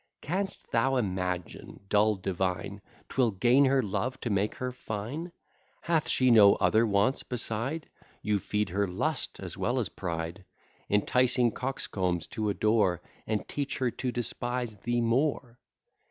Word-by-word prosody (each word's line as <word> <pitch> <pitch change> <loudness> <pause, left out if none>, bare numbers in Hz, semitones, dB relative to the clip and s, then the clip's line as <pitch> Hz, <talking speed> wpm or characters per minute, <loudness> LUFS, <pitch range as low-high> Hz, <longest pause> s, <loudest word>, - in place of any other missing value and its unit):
Canst 195 +5 -3
thou 130 +4 +2
imagine, 90 -6 -3
dull 105 +1 +3
divine, 95 +1 -2 0.3
'Twill 125 -3 +2
gain 120 +7 +4
her 135 -1 +3
love, 105 +6 -2
to 120 - -2
make 100 +1 0
her 125 0 -3
fine? 125 - -5 0.5
Hath 165 -2 +1
she 130 -1 +4
no 105 -3 +8
other 115 +1 +3
wants 105 +6 +2
beside? 125 +5 -3 0.4
You 105 -1 +1
feed 105 +1 -1
her 100 +3 0
lust 90 - -2
as - - -7
well - - 0
as - - 0
pride, 85 +2 -4 0.5
Enticing 125 +3 +3
coxcombs 95 -10 -2
to 110 -2 -1
adore, 105 -4 +2 0.3
And 110 -1 -1
teach 145 -1 -3
her 125 -2 0
to 125 +1 -3
despise 120 -1 -2
thee 120 +4 -1
more. 125 0 0
110 Hz, 140 wpm, -29 LUFS, 100-125 Hz, 0.5 s, no